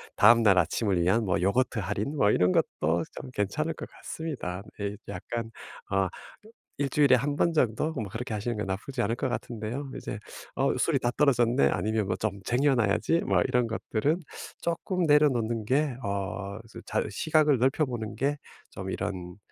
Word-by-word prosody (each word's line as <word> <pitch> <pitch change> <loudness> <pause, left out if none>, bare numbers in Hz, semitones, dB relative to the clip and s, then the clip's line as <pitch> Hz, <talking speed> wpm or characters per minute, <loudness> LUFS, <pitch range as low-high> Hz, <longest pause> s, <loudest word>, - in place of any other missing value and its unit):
다음날 115 -3 +6
아침을 95 0 +1
위한 110 +6 +2
뭐 90 -3 +1
요거트 115 +5 +1
할인 105 - -2
뭐 105 -7 +4
이런 90 0 +3
것도 85 +1 +1 0.2
좀 130 - -9
괜찮을 150 +11 -1
것 - - -8
같습니다. 125 - -5 0.2
네. 100 0 -2
약간 115 +4 -5 0.4
아 95 0 +2 0.7
1 140 - +1
주일에 140 -1 +5
1 140 +4 +1
번 170 - +2
정도 150 +1 +1
뭐 115 -8 -3
그렇게 115 +2 -5
하시는 110 +2 -2
게 105 - -2
나쁘지 110 +7 -3
않을 115 +2 +1
것 130 - -1
같은데요. 120 +4 -4
이제 105 - -5 0.4
'어 - - +2
술이 - - +2
다 120 - 0
떨어졌네.' 120 - +4
아니면 110 +5 0
뭐 - - -1
'좀 100 -2 -3
쟁여 135 +3 +3
놔야지.' 120 +8 +2
뭐 - - +2
이런 125 -2 +1
것들은 115 +7 -1 0.4
쪼끔 170 +2 -1
내려놓는 120 -7 +3
게 140 +2 +1
어 100 0 -3
저 - - -9
잘 - - -1
시각을 150 +4 +3
넓혀 135 +5 +2
보는 115 -4 -4
게 145 +2 0 0.3
좀 95 0 -6
이런 90 -2 -4
115 Hz, 315 characters per minute, -28 LUFS, 100-140 Hz, 0.7 s, 다음날